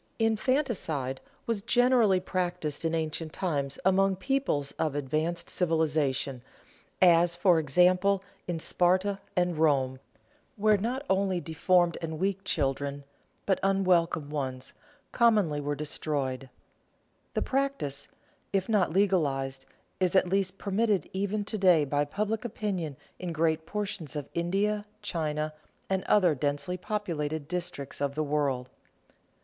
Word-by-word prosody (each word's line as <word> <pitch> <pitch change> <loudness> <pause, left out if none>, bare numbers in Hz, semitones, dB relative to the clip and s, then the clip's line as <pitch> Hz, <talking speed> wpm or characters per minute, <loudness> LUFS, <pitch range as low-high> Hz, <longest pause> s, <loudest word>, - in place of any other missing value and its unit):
Infanticide 220 - 0 0.2
was 230 -3 -1
generally 240 -4 +4
practiced 180 -5 -2
in 165 0 0
ancient 160 0 -3
times 140 -7 -2
among 190 0 +4
peoples 190 - -1
of 155 -3 0
advanced 155 +5 -1
civilization, 150 -6 0 0.6
as, 170 -1 +5
for 175 -2 +4
example, 180 +6 +3 0.2
in 175 -2 -2
Sparta 185 +4 +2 0.2
and 175 -3 +1
Rome, 135 -4 +2 0.6
where 210 -1 +3
not 250 +7 -2
only 190 -1 +1
deformed 175 +1 +2
and 160 -1 -4
weak 195 +2 -1
children, 140 -4 -1 0.4
but 190 - +2
unwelcome 180 -6 +2
ones, 130 -3 -4 0.4
commonly 210 -11 +3
were 145 0 -2
destroyed. 140 -3 -3 0.9
The - - +1
practice, 270 - -1 0.4
if 195 -2 0
not 205 -7 +2
legalized, 145 -9 +1 0.3
is 185 0 +1
at 190 - +5
least 195 0 0
permitted 205 0 0
even 200 +2 -1
to 215 0 -2
day 180 -6 +5
by 145 +1 +1
public 210 +8 -2
opinion 190 - -3 0.2
in 180 -2 -4
great 160 0 0
portions 200 -8 -4
of 145 -2 -4
India, 205 +5 0 0.2
China, 155 -5 -2 0.4
and 190 -1 +1
other 185 -6 +4
densely 145 +6 -2
populated 165 -7 -3
districts 170 -6 -4
of 140 -1 -1
the 155 - 0
world. 140 -4 0
175 Hz, 125 wpm, -29 LUFS, 150-195 Hz, 0.9 s, as